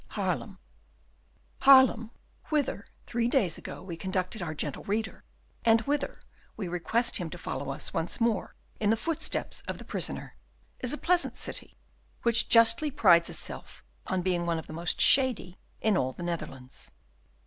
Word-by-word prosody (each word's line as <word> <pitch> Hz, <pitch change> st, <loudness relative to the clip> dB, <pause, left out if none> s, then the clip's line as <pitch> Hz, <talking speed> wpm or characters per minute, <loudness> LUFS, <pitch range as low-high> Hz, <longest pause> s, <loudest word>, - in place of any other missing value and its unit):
Haarlem -, -, -2 dB, 1.0 s
Haarlem, 260 Hz, -4 st, +6 dB, 0.4 s
whither, 285 Hz, -9 st, -1 dB, 0.2 s
three 235 Hz, 0 st, -1 dB
days 215 Hz, -, +1 dB
ago, -, -, -8 dB
we 180 Hz, -3 st, -6 dB
conducted 185 Hz, +3 st, -3 dB
our 160 Hz, -3 st, -4 dB
gentle 145 Hz, -2 st, -4 dB
reader, 220 Hz, +2 st, -3 dB, 0.4 s
and 225 Hz, -1 st, +4 dB
whither 280 Hz, +3 st, -2 dB, 0.4 s
we 200 Hz, -4 st, -4 dB
request 220 Hz, +7 st, 0 dB
him 175 Hz, -5 st, -4 dB
to 175 Hz, -, -8 dB
follow 140 Hz, -4 st, -5 dB
us 135 Hz, -, -4 dB
once 165 Hz, +1 st, -1 dB
more 230 Hz, -4 st, 0 dB, 0.2 s
in 210 Hz, -, +1 dB
the 225 Hz, -, +3 dB
footsteps 320 Hz, +7 st, -3 dB
of -, -, -4 dB
the -, -, -11 dB
prisoner, -, -, -3 dB, 0.4 s
is 250 Hz, -, -1 dB
a 300 Hz, -, 0 dB
pleasant 350 Hz, +2 st, +1 dB
city, -, -, -3 dB, 0.5 s
which 235 Hz, -1 st, +4 dB
justly 230 Hz, +6 st, +6 dB
prides 175 Hz, -11 st, +4 dB
itself -, -, -8 dB, 0.2 s
on 185 Hz, -1 st, -1 dB
being 175 Hz, -2 st, 0 dB
one 170 Hz, -1 st, 0 dB
of 160 Hz, -, -6 dB
the -, -, -10 dB
most 170 Hz, +1 st, -2 dB
shady 250 Hz, -9 st, +4 dB, 0.2 s
in 220 Hz, -2 st, +2 dB
all 130 Hz, -7 st, 0 dB
the 175 Hz, -, -8 dB
Netherlands. 150 Hz, -7 st, -6 dB
205 Hz, 160 wpm, -28 LUFS, 170-235 Hz, 1.0 s, Haarlem